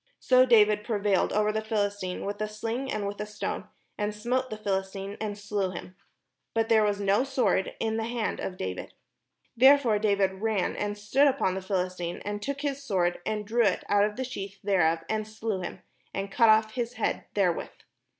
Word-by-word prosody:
So 255 0 +5
David 210 -3 +5
prevailed 205 -4 +1
over 210 0 +2
the 215 0 -1
Philistine 205 -4 -2
with 205 +1 -4
a 215 - 0
sling 230 +5 -4
and 205 - -2
with 200 +1 -4
a - - -2
stone, 210 - -4 0.3
and 210 0 -1
smote 250 +4 -1
the 215 - -5
Philistine, 195 -1 -3
and 210 -2 -3
slew 205 -2 -2
him; 180 +1 -8 0.6
but 225 0 +1
there 225 -1 +5
was 205 -1 +1
no 200 +4 +3
sword 265 -7 0
in 220 0 -1
the 225 - -1
hand 235 -2 -2
of 185 - -4
David. 95 0 -5 0.6
Therefore 260 -3 +6
David 200 -2 +1
ran, 215 -4 0
and 205 0 -3
stood 260 +8 +3
upon 265 -9 +1
the 190 - -3
Philis 185 -1 -2
tine, 175 0 -3
and 205 0 -3
took 280 +5 -3
his 280 -2 -2
sword, 180 -9 0
and 215 -1 -2
drew 235 +3 +2
it 195 - +1
out 205 0 +4
of 210 0 0
the 260 - -3
sheath 200 -6 -6
thereof, 165 -4 +2
and 215 -1 -2
slew 215 -3 -3
him, - - -6 0.3
and 195 0 -3
cut 230 +1 +5
off 220 0 +5
his 240 -1 -2
head 230 - -2
therewith. 185 -5 +1
210 Hz, 200 wpm, -28 LUFS, 195-225 Hz, 0.6 s, Therefore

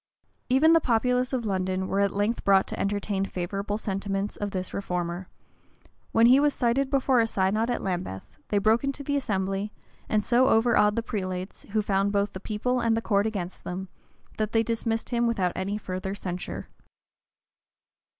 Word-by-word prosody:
[] - - -43
Even 290 +6 +5
the 330 - +7
populace 250 +1 +1
of 250 -4 -1
London 185 -1 -1
were 195 - 0
at 200 -1 +3
length 205 +4 -1
brought 195 -1 +5
to - - -6
entertain 200 -1 -1
favorable 195 +2 -3
sentiments 195 -1 -3
of 205 - -3
this 185 -1 -4
reformer: 180 -1 -3 0.8
when 225 +1 +5
he 255 +3 +7
was 290 0 +2
cited 260 +3 +1
before 270 -2 +3
a 225 - +3
synod 215 +3 +1
at 245 - -1
Lambeth, 175 - -3 0.2
they 205 - 0
broke 220 +4 +3
into 275 +1 -3
the 285 +1 -1
assembly, 195 -5 -1 0.4
and 215 -1 +2
so 250 +4 +4
overawed 225 -3 +4
the 230 - -1
prelates, 185 -3 -5
who 215 -1 +2
found 200 0 +1
both 200 0 0
the 185 - -6
people 230 +5 -1
and 230 -1 +2
the - - 0
court 205 0 +2
against 190 -5 -5
them, 185 +1 -5 0.5
that 215 0 -1
they 225 0 +4
dismissed 225 0 -2
him 235 0 +2
without 190 -6 +1
any 195 +3 -2
further 190 -1 -4
censure. 180 -3 -5
205 Hz, 180 wpm, -27 LUFS, 190-235 Hz, 0.8 s, the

